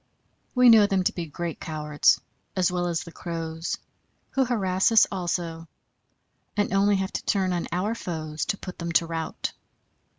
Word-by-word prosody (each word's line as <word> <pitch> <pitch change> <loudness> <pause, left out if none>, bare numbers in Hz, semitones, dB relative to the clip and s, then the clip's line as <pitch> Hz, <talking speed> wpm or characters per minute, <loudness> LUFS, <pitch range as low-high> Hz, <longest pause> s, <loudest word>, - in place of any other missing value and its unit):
We 250 -1 +7
know 220 -3 +8
them 195 -2 +1
to - - +1
be 170 -2 -4
great 165 +2 -5
cowards, 150 -2 +2 0.4
as 185 -1 +2
well 175 -1 0
as 170 -2 -1
the 170 - -11
crows, 165 -1 -4 0.5
who 270 - +2
harass 200 -3 +1
us 225 - +7
also, 170 -3 -3 0.9
and 205 -2 +1
only 200 +1 +4
have 190 0 -1
to - - -3
turn 190 -3 +1
on 175 - -2
our 185 +6 0
foes 155 -7 -4
to 200 - -1
put 185 -2 -8
them 170 0 -3
to 165 - +4
rout. 165 -1 -3
180 Hz, 170 wpm, -26 LUFS, 165-195 Hz, 0.9 s, know